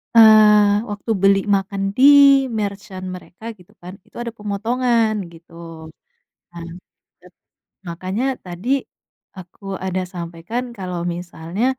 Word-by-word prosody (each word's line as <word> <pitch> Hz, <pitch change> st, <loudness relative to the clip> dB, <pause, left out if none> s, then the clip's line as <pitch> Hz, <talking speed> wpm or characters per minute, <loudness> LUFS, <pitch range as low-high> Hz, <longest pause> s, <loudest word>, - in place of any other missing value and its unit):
eee, 210 Hz, -1 st, +6 dB
waktu 205 Hz, +2 st, -4 dB
beli 195 Hz, 0 st, +5 dB, 0.2 s
makan 195 Hz, 0 st, -3 dB, 0.2 s
di-merchant 255 Hz, -9 st, +4 dB
mereka 180 Hz, +2 st, -15 dB, 0.2 s
gitu 180 Hz, -, -20 dB
kan 180 Hz, +1 st, -9 dB
itu -, -, -29 dB
ada 235 Hz, -, -5 dB
pemotongan 225 Hz, +2 st, 0 dB, 0.2 s
gitu, 165 Hz, +1 st, -18 dB, 1.0 s
nah. 170 Hz, -1 st, -8 dB, 1.3 s
Makanya 195 Hz, +10 st, -3 dB
tadi, 180 Hz, +7 st, -6 dB, 0.7 s
aku 185 Hz, +2 st, -14 dB, 0.2 s
ada 185 Hz, 0 st, -2 dB
sampaikan 170 Hz, +8 st, -5 dB
kalau 180 Hz, -3 st, -5 dB
misalnya, 175 Hz, +3 st, -5 dB
200 Hz, 100 wpm, -20 LUFS, 180-230 Hz, 1.3 s, eee